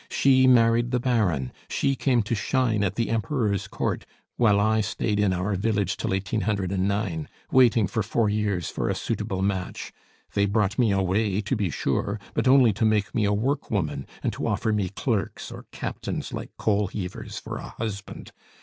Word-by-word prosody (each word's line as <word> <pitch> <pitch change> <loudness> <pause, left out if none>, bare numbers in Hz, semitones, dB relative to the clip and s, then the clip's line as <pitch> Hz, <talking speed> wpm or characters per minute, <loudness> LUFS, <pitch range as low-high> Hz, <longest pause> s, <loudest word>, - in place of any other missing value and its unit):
She 130 -1 +4
married 120 -1 +4
the 125 0 +1
Baron, 105 - +1 0.2
she 135 -1 +1
came 125 -4 +2
to 105 - -2
shine 115 -1 +1
at 100 0 -1
the 115 0 -1
Emperor's 110 -3 0
Court, - - -2 0.3
while 105 -4 +4
I 110 +1 +3
stayed 105 +1 -1
in 105 -2 +3
our 95 +3 -1
village 100 -1 0
till - - -3
1809, 95 -2 -1 0.2
waiting 120 -4 +5
for 110 +3 -1
four 110 +2 +1
years 105 -4 0
for - - -2
a - - 0
suitable 95 0 -2
match; 95 -2 -3 0.4
they 100 0 +2
brought 105 +2 0
me 115 -4 +4
away, 95 +1 +1
to 105 +6 -1
be 105 -5 0
sure, 100 - -1
but - - 0
only 130 -4 +6
to 110 - -2
make 105 -2 +2
me 110 - +1
a 100 - +2
work 125 +8 0
woman, 85 -9 -2 0.2
and - - 0
to - - -3
offer 110 - 0
me 100 -3 0
clerks 105 +1 -2
or - - -10
captains - - -4
like - - -5
coalheavers 100 -3 -2
for - - -6
a - - -7
husband! 105 -3 -6
105 Hz, 175 wpm, -25 LUFS, 100-115 Hz, 0.4 s, only